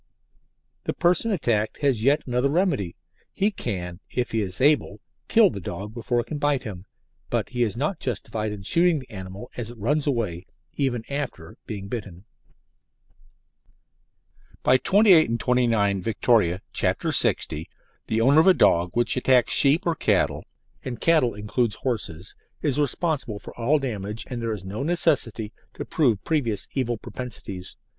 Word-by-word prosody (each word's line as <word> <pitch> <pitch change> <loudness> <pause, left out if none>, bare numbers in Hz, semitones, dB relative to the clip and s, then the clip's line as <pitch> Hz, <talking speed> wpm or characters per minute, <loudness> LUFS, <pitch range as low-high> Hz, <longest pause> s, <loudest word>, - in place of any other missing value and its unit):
The - - -2
person 180 +6 +2
attacked 115 - 0
has 135 -6 +2
yet 140 +4 +3
another 125 +2 +1
remedy. 145 - 0 0.4
He 205 +2 +1
can, 90 - -4
if 125 -2 -2
he 115 - 0
is 95 -2 -3
able, 135 -7 +2 0.3
kill 220 -5 +5
the - - -6
dog 100 +4 -6
before 120 +1 -1
it - - -9
can 150 +3 -5
bite 145 -3 +1
him, 95 -6 -7 0.4
but - - -1
he 125 -1 -3
is 115 -3 0
not 155 +6 -1
justified 110 -3 -3
in 100 -2 -7
shooting 170 - +4
the 130 - -9
animal 95 +3 -8
as 120 -2 -4
it 120 - -11
runs 145 +8 0
away, 105 -10 -2 0.3
even 130 -5 -1
after 140 - -5
being 100 -3 -6
bitten. 100 -4 -7 2.4
By 130 - +5
28 195 - +5
and 115 0 -1
29 115 -6 +2
Vict., 115 +3 -4 0.5
c. - - +1 0.2
60, 75 +2 -1 0.4
the 110 +1 0
owner 140 +6 +5
of 160 - +5
a 190 - +7
dog 85 +1 +4
which 120 0 +1
attacks 125 -2 +3
sheep 145 +7 +4
or 170 - +2
cattle - - +1 0.4
and 120 -3 -5
cattle 155 -9 +3
includes 105 +1 -1
horses 105 -9 -4 0.3
is 145 -2 +1
responsible 145 - 0
for - - -11
all 125 +6 +2
damage, 110 -5 -4
and 120 -1 -3
there 115 -1 -2
is 100 -4 -5
no 100 +6 -5
necessity 140 -9 0 0.2
to - - -5
prove 120 -10 +1
previous 125 -10 -1
evil 120 -3 -1
propensities. 100 -7 -8
120 Hz, 160 wpm, -24 LUFS, 105-145 Hz, 2.4 s, a